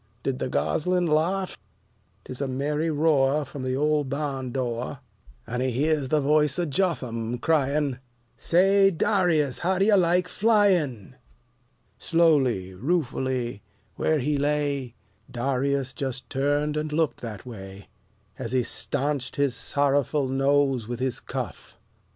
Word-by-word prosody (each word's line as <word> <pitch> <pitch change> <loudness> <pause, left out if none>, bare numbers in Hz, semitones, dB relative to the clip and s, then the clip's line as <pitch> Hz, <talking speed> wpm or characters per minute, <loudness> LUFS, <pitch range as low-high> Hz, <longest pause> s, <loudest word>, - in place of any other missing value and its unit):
Did 135 -1 -2
the - - -2
gosling 180 +7 0
laugh? 170 +5 0 0.7
'Tis 130 +1 -8
a 140 - 0
merry 150 +5 -1
roar 150 -2 +2
from 145 -4 -8
the 130 0 -1
old 150 0 +1
barn 135 -2 -3
door, 125 +1 -3 0.5
And 125 +2 -3
he 130 - +1
hears 145 +3 0
the 155 +3 +2
voice 150 0 +2
of 170 -4 -1
Jotham 125 -9 -1
crying, 145 -1 +1 0.4
"Say, 195 +3 +4
D'rius! 170 -6 +1
how 185 +2 0
do 195 - +3
you 215 -1 +5
like 180 -1 +3
flyin'?" 180 - +1 0.8
Slowly, 135 - +2
ruefully, 130 - -1 0.3
where 155 - +1
he 145 +1 0
lay, 140 -3 -1 0.3
Darius 135 +1 -1
just 130 -2 -4
turned 145 +2 0
and 155 0 -2
looked 160 0 0
that 110 -5 -7
way, 95 -4 -10 0.5
As 125 -1 -4
he 130 -1 +2
stanched 135 +1 -2
his 140 -3 +1
sorrowful 140 +1 +1
nose 135 -2 +1
with 120 0 -4
his 130 -1 -1
cuff. 125 - -7
140 Hz, 135 wpm, -25 LUFS, 130-155 Hz, 0.8 s, you